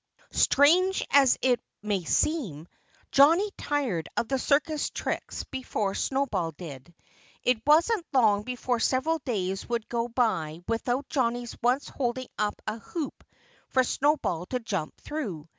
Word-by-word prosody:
Strange 360 Hz, +7 st, +4 dB
as 275 Hz, -3 st, +6 dB
it 250 Hz, -2 st, +3 dB, 0.2 s
may 205 Hz, -4 st, -1 dB
seem, 175 Hz, -, 0 dB, 0.4 s
Johnnie 330 Hz, +9 st, +5 dB
tired 255 Hz, -, -2 dB
of 235 Hz, -, +1 dB
the 270 Hz, +1 st, 0 dB
circus 295 Hz, +3 st, +1 dB
tricks -, -, -4 dB
before 220 Hz, -7 st, -2 dB
Snowball 205 Hz, -11 st, -1 dB
did. 150 Hz, -2 st, -10 dB, 0.5 s
It 245 Hz, -3 st, +2 dB
wasn't 340 Hz, +5 st, +4 dB
long 220 Hz, -7 st, +4 dB
before 250 Hz, +1 st, -2 dB
several 290 Hz, +8 st, +1 dB
days 195 Hz, -8 st, -3 dB
would 235 Hz, -2 st, -2 dB
go 235 Hz, 0 st, -1 dB
by 190 Hz, -10 st, 0 dB
without 245 Hz, +4 st, -1 dB
Johnnie's 240 Hz, -3 st, -1 dB
once 250 Hz, +4 st, +1 dB
holding 255 Hz, -1 st, -3 dB
up 210 Hz, -1 st, -1 dB
a 215 Hz, +1 st, -3 dB
hoop 315 Hz, +5 st, -6 dB, 0.5 s
for 260 Hz, -, +3 dB
Snowball 250 Hz, -, 0 dB
to 250 Hz, -, -2 dB
jump 195 Hz, -9 st, -4 dB
through. 200 Hz, -, -5 dB
245 Hz, 135 wpm, -27 LUFS, 205-280 Hz, 0.5 s, as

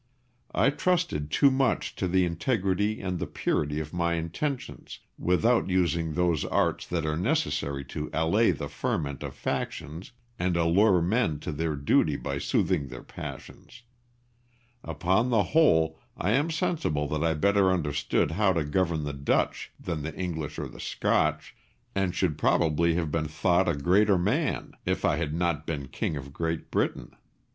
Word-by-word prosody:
I 115 Hz, +8 st, +4 dB
trusted 165 Hz, -, 0 dB
too 140 Hz, -, +4 dB
much 130 Hz, 0 st, 0 dB
to 95 Hz, -, -1 dB
the 90 Hz, +1 st, +3 dB
integrity 100 Hz, +3 st, 0 dB
and 90 Hz, -2 st, -3 dB
the -, -, -3 dB
purity 75 Hz, 0 st, -1 dB
of 80 Hz, +1 st, -6 dB
my 85 Hz, -1 st, 0 dB
intentions, 105 Hz, -, -4 dB, 0.2 s
without 110 Hz, +6 st, +2 dB
using 85 Hz, -3 st, +1 dB
those 85 Hz, -4 st, +1 dB
arts -, -, 0 dB
that 85 Hz, -3 st, -2 dB
are 75 Hz, 0 st, 0 dB
necessary 70 Hz, -4 st, -1 dB
to 75 Hz, -1 st, -4 dB
allay 85 Hz, +8 st, +3 dB
the -, -, -1 dB
ferment 70 Hz, -3 st, -3 dB
of -, -, -6 dB
factions 80 Hz, +6 st, -4 dB, 0.3 s
and 90 Hz, -1 st, +1 dB
allure 90 Hz, +2 st, +4 dB
men 90 Hz, -5 st, +1 dB
to 85 Hz, -, -4 dB
their 80 Hz, +1 st, -2 dB
duty 70 Hz, 0 st, +2 dB
by 70 Hz, 0 st, -3 dB
soothing 70 Hz, 0 st, 0 dB
their 65 Hz, -1 st, -9 dB
passions. 120 Hz, 0 st, -10 dB, 1.0 s
Upon 95 Hz, +7 st, +1 dB
the 115 Hz, -4 st, +3 dB
whole 80 Hz, -, +3 dB, 0.2 s
I 95 Hz, -, 0 dB
am 145 Hz, +8 st, +2 dB
sensible 160 Hz, -, -1 dB
that 75 Hz, +1 st, -1 dB
I 80 Hz, -1 st, +2 dB
better 100 Hz, +3 st, +3 dB
understood 75 Hz, -3 st, 0 dB
how 95 Hz, +2 st, +2 dB
to 80 Hz, -2 st, 0 dB
govern 80 Hz, +1 st, 0 dB
the 75 Hz, -1 st, -3 dB
Dutch 70 Hz, +1 st, -1 dB
than 80 Hz, -4 st, -4 dB
the 80 Hz, +2 st, -5 dB
English 80 Hz, -5 st, -4 dB
or -, -, -3 dB
the -, -, -13 dB
Scotch, 75 Hz, +1 st, 0 dB, 0.4 s
and 95 Hz, -2 st, 0 dB
should 85 Hz, -6 st, 0 dB
probably 85 Hz, 0 st, +2 dB
have 80 Hz, -3 st, -1 dB
been 75 Hz, -1 st, -1 dB
thought 85 Hz, +4 st, +2 dB
a 85 Hz, -, +1 dB
greater 95 Hz, +7 st, +3 dB
man 90 Hz, -, 0 dB
if -, -, -1 dB
I 75 Hz, -, +2 dB
had 80 Hz, -2 st, -2 dB
not 85 Hz, -2 st, -1 dB
been 70 Hz, -5 st, -4 dB
King 75 Hz, -, -2 dB
of 70 Hz, 0 st, -8 dB
Great 80 Hz, 0 st, -3 dB
Britain. -, -, -1 dB
85 Hz, 165 wpm, -27 LUFS, 75-95 Hz, 1.0 s, I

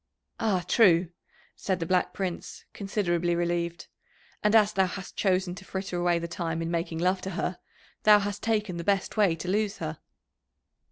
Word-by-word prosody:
"Ah, 190 Hz, -6 st, +1 dB
true!" 180 Hz, -6 st, +5 dB, 0.5 s
said 190 Hz, -2 st, -2 dB
the 165 Hz, -, -2 dB
Black 180 Hz, +2 st, +1 dB
Prince, 185 Hz, -3 st, -5 dB
considerably 175 Hz, -4 st, 0 dB
relieved. 170 Hz, 0 st, -1 dB, 0.6 s
"And 210 Hz, +1 st, +3 dB
as 215 Hz, -1 st, +5 dB
thou 190 Hz, -1 st, +3 dB
hast 190 Hz, +1 st, -7 dB
chosen 185 Hz, -2 st, +1 dB
to 190 Hz, +1 st, -10 dB
fritter 190 Hz, -1 st, -5 dB
away 175 Hz, -1 st, +2 dB
the 170 Hz, 0 st, -3 dB
time 165 Hz, -1 st, -3 dB
in 165 Hz, -, -3 dB
making 165 Hz, -1 st, -2 dB
love 185 Hz, +2 st, +1 dB
to 190 Hz, -, -4 dB
her, 180 Hz, -, -2 dB, 0.4 s
thou 210 Hz, -1 st, +7 dB
hast 205 Hz, 0 st, -3 dB
taken 210 Hz, -5 st, 0 dB
the 170 Hz, -, -4 dB
best 195 Hz, +1 st, 0 dB
way 200 Hz, -6 st, +3 dB
to 165 Hz, +2 st, -7 dB
lose 205 Hz, +2 st, 0 dB
her." 155 Hz, -1 st, -5 dB
185 Hz, 175 wpm, -27 LUFS, 170-200 Hz, 0.6 s, thou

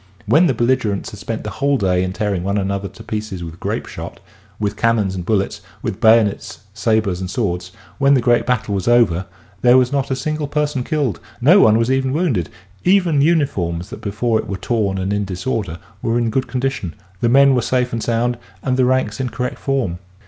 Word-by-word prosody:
When 155 Hz, -, +4 dB
the 130 Hz, -, +1 dB
belligerents 120 Hz, -4 st, 0 dB
had -, -, -10 dB
spent -, -, -4 dB
the -, -, -5 dB
whole 140 Hz, 0 st, +1 dB
day 90 Hz, -4 st, +1 dB
in 95 Hz, -, -2 dB
tearing 100 Hz, -2 st, -2 dB
one 100 Hz, +2 st, 0 dB
another 100 Hz, 0 st, -1 dB
to 110 Hz, +3 st, -13 dB
pieces 105 Hz, -5 st, -4 dB
with 85 Hz, 0 st, -8 dB
grape -, -, -3 dB
shot, -, -, -8 dB, 0.4 s
with 105 Hz, -1 st, -1 dB
cannons 110 Hz, -4 st, +1 dB
and 90 Hz, -2 st, -4 dB
bullets, 100 Hz, 0 st, -1 dB, 0.2 s
with 95 Hz, -, -4 dB
bayonets, 110 Hz, -3 st, +3 dB
sabers 110 Hz, -4 st, 0 dB
and 90 Hz, -, -4 dB
swords 90 Hz, -4 st, -2 dB
— -, -, -26 dB
when 140 Hz, 0 st, +5 dB
the -, -, +3 dB
great 120 Hz, 0 st, +2 dB
battle 125 Hz, -5 st, 0 dB
was 95 Hz, 0 st, -2 dB
over, 100 Hz, -7 st, +3 dB, 0.3 s
there 125 Hz, +1 st, +6 dB
was 125 Hz, 0 st, +3 dB
not 140 Hz, -1 st, 0 dB
a 130 Hz, -, 0 dB
single 155 Hz, +1 st, -2 dB
person 150 Hz, -3 st, -1 dB
killed, 145 Hz, -, -1 dB, 0.2 s
no 160 Hz, +11 st, +6 dB
one 110 Hz, -, +6 dB
was 115 Hz, +2 st, +1 dB
even 130 Hz, 0 st, +1 dB
wounded; 140 Hz, -, 0 dB, 0.3 s
even 180 Hz, -6 st, +3 dB
uniforms 100 Hz, -, 0 dB
that -, -, -8 dB
before 110 Hz, +2 st, 0 dB
it -, -, -5 dB
were 100 Hz, -, -3 dB
torn 105 Hz, -3 st, -1 dB
and 95 Hz, +2 st, -1 dB
in 105 Hz, 0 st, 0 dB
disorder 95 Hz, -1 st, -3 dB, 0.2 s
were 115 Hz, +1 st, 0 dB
in 115 Hz, -2 st, 0 dB
good 130 Hz, +3 st, 0 dB
condition, 130 Hz, -9 st, -3 dB, 0.2 s
the 120 Hz, -, +1 dB
men 135 Hz, +2 st, +6 dB
were 125 Hz, -, +2 dB
safe 125 Hz, +1 st, 0 dB
and 115 Hz, -, -2 dB
sound, 120 Hz, +1 st, 0 dB, 0.2 s
and 130 Hz, -1 st, 0 dB
the 130 Hz, -, +4 dB
ranks 125 Hz, -4 st, 0 dB
in 130 Hz, -1 st, -1 dB
correct 125 Hz, +1 st, -4 dB
form. 125 Hz, -11 st, -1 dB
115 Hz, 210 wpm, -19 LUFS, 100-130 Hz, 0.4 s, there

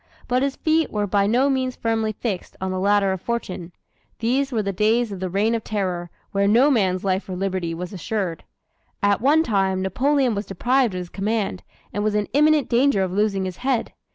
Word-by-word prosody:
But 250 Hz, +1 st, +1 dB
his 275 Hz, 0 st, 0 dB
feet 320 Hz, 0 st, +1 dB
were 210 Hz, -1 st, -1 dB
by 200 Hz, 0 st, +2 dB
no 245 Hz, +6 st, +3 dB
means 260 Hz, -2 st, 0 dB
firmly 225 Hz, -1 st, 0 dB
fixed 205 Hz, -3 st, -4 dB
on 190 Hz, 0 st, -2 dB
the 185 Hz, -, -2 dB
ladder 200 Hz, 0 st, +3 dB
of 190 Hz, -2 st, -3 dB
fortune. 190 Hz, -7 st, -4 dB, 0.5 s
These 265 Hz, +5 st, 0 dB
were 220 Hz, -4 st, 0 dB
the 195 Hz, 0 st, -2 dB
days 220 Hz, +4 st, +2 dB
of 195 Hz, -, -6 dB
the 185 Hz, 0 st, -3 dB
Reign 205 Hz, +5 st, +1 dB
of 230 Hz, -, -1 dB
Terror 180 Hz, -4 st, -2 dB, 0.2 s
when 200 Hz, 0 st, +2 dB
no 260 Hz, +7 st, +5 dB
man's 190 Hz, -7 st, +1 dB
life 190 Hz, 0 st, -1 dB
or 185 Hz, -, -3 dB
liberty 185 Hz, -3 st, -2 dB
was 180 Hz, +3 st, -6 dB
assured. 185 Hz, -1 st, -3 dB, 0.6 s
At 200 Hz, 0 st, +3 dB
one 300 Hz, +5 st, +4 dB
time, 195 Hz, -6 st, +1 dB
Napoleon 260 Hz, +6 st, +1 dB
was 200 Hz, -1 st, -4 dB
deprived 240 Hz, +3 st, +1 dB
of -, -, -2 dB
his 175 Hz, -, -8 dB
command, 205 Hz, -1 st, -2 dB, 0.3 s
and 205 Hz, -, -1 dB
was 215 Hz, 0 st, 0 dB
in 210 Hz, -1 st, 0 dB
imminent 300 Hz, 0 st, +4 dB
danger 245 Hz, -4 st, +3 dB
of 185 Hz, -, -2 dB
losing 195 Hz, -1 st, 0 dB
his 185 Hz, -1 st, -5 dB
head. 255 Hz, -2 st, -1 dB
205 Hz, 210 wpm, -23 LUFS, 190-245 Hz, 0.6 s, no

